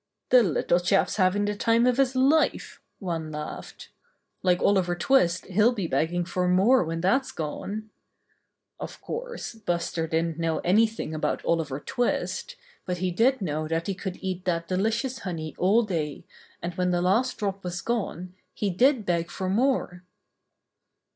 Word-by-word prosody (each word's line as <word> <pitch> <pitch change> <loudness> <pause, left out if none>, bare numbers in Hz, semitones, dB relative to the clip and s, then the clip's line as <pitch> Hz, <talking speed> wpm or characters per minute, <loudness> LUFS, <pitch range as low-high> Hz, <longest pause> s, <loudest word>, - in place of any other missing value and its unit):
"The 250 - +7
little 175 -2 +2
chap's 195 +4 +1
having 195 +1 +2
the 205 - 0
time 230 +3 +2
of 250 0 +3
his 265 -1 +2
life," 275 +5 +2 0.2
one 165 -5 -4
laughed. 150 0 -7 0.5
"Like 180 -1 +2
Oliver 185 -3 +2
Twist 180 -3 +2
he'll 210 +6 +3
be 200 -6 -3
begging 165 +4 0
for 180 0 -1
more 195 +9 +4
when 165 0 -3
that's 260 +10 +2
gone." 205 +7 -5 0.9
Of - - -7
course, 485 - -6
Buster 170 -6 -2
didn't 165 0 -1
know 165 -1 0
anything 215 -2 +2
about 155 - -2
Oliver 155 -5 0
Twist, 245 - -2 0.3
but 180 -1 -3
he 180 +1 -1
did 230 +5 +2
know 155 -2 -2
that 165 +1 -1
he 200 - -1
could 190 -1 -5
eat 185 -1 -3
that 170 -2 -1
delicious 225 +7 -1
honey 160 -5 -5
all 205 +6 +4
day, 160 -8 -3 0.4
and 175 +1 -3
when 180 +1 0
the 175 0 +1
last 225 +8 +2
drop 195 -1 -3
was 175 -1 -4
gone 185 -6 -3 0.2
he 205 -2 -1
did 245 +4 +3
beg 170 -2 0
for 185 -1 -3
more. 225 -6 +1
185 Hz, 160 wpm, -26 LUFS, 170-225 Hz, 0.9 s, The